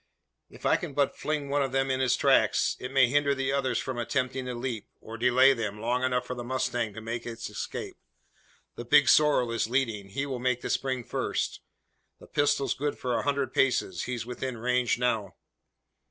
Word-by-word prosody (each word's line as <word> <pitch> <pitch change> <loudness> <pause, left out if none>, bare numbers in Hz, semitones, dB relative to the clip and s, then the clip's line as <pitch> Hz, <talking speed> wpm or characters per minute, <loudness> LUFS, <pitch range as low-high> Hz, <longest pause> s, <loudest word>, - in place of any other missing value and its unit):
"If - - -13
I - - +4
can 165 -8 -7
but 140 -2 +1
fling 150 -2 -2
one 145 +1 +1
of 135 -2 -1
them 135 0 +1
in 130 - 0
his 130 -2 +3
tracks, - - +3
it 125 - -6
may 135 -1 +5
hinder 140 +2 +2
the 135 0 -1
others 135 -2 0
from 130 -2 -3
attempting 130 +1 -1
the 125 -1 -4
leap; 120 -3 -4
or 110 - -9
delay 125 +3 +5
them 105 -4 -4
long 120 +3 0
enough 125 -1 0
for - - -4
the 120 -1 -6
mustang 120 -2 -1
to 110 - -7
make 115 +2 -5
its 115 -1 -6
escape. - - -5 0.8
The 120 - -7
big 145 +5 +5
sorrel 145 -6 +4
is 115 -1 -1
leading. 115 -6 -1
He 140 +8 -2
will 130 -3 -4
make 125 0 0
the - - -3
spring 130 -2 -1
first. - - -2 0.6
The - - -13
pistol's 145 -2 +1
good 145 +1 -3
for 125 -1 -2
a - - +1
hundred 140 -1 -1
paces. 95 -9 +1
He's 120 -3 -4
within 125 0 -5
range 125 +1 +1
now!" 115 -5 -1
125 Hz, 200 wpm, -28 LUFS, 120-135 Hz, 0.8 s, may